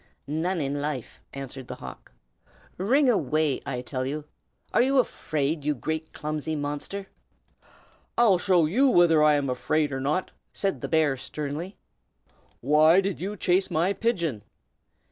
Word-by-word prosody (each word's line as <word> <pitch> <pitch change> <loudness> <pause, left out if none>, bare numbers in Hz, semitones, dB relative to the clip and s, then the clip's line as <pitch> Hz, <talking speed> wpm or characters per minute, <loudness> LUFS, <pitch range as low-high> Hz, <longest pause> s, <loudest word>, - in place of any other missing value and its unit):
"None 165 +5 -1
in 140 0 -2
life!" 145 -5 -4
answered 135 -1 -7
the - - -6
hawk. - - -11 0.7
"Wring 260 +9 +3
away, 155 - +1
I 125 -2 -3
tell 130 0 -3
you! 145 +3 -4 0.5
Are - - +5
you 270 +2 +2
afraid, 155 - 0
you 150 0 0
great 160 +4 -4
clumsy 155 +1 -3
monster?" 145 +7 -4 1.1
"I'll 215 -7 +5
soon - - -5
show 180 -4 +5
you 255 - +3
whether 170 -7 +5
I 150 -1 +5
am 145 -1 0
afraid 145 +4 0
or 135 - -3
not!" 150 +7 -1 0.2
said 195 -1 -1
the - - -3
bear, 155 -4 +2
sternly. 150 +8 -5 0.8
"Why 155 +6 +5
did 195 -3 -2
you 205 +3 -4
chase 185 +1 +2
my 175 +5 +1
pigeon?" 170 - -1
155 Hz, 150 wpm, -26 LUFS, 145-185 Hz, 1.1 s, Are